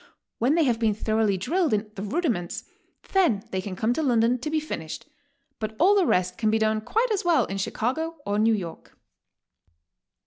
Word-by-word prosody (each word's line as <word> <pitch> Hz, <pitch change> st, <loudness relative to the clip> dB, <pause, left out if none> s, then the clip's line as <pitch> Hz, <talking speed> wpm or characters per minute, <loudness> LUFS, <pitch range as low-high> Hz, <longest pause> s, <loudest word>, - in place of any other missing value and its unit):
When 255 Hz, +7 st, +3 dB
they 335 Hz, -, +4 dB
have 240 Hz, -5 st, +1 dB
been 220 Hz, -3 st, +2 dB
thoroughly 215 Hz, -2 st, +1 dB
drilled 315 Hz, -, +1 dB
in 210 Hz, 0 st, -4 dB
the 195 Hz, -, -7 dB
rudiments, 210 Hz, -, -2 dB, 0.5 s
then 330 Hz, -, +3 dB
they 190 Hz, -, -1 dB
can 185 Hz, -1 st, -6 dB
come 220 Hz, +5 st, +1 dB
to 320 Hz, -, -1 dB
London 245 Hz, -3 st, +2 dB
to 270 Hz, -, -4 dB
be 315 Hz, 0 st, +1 dB
finished, 160 Hz, -, -6 dB, 0.5 s
but 220 Hz, 0 st, -4 dB
all 375 Hz, +5 st, +5 dB
the 385 Hz, -4 st, +3 dB
rest 180 Hz, 0 st, +1 dB
can 220 Hz, -, +2 dB
be 220 Hz, -, +3 dB
done 215 Hz, 0 st, +1 dB
quite 450 Hz, -, 0 dB
as 410 Hz, -, 0 dB
well 345 Hz, -2 st, +3 dB
in 195 Hz, +1 st, -4 dB
Chicago 265 Hz, +12 st, -2 dB
or 205 Hz, +1 st, 0 dB
New 220 Hz, +1 st, +4 dB
York." 175 Hz, -5 st, -8 dB
225 Hz, 195 wpm, -25 LUFS, 205-315 Hz, 0.5 s, all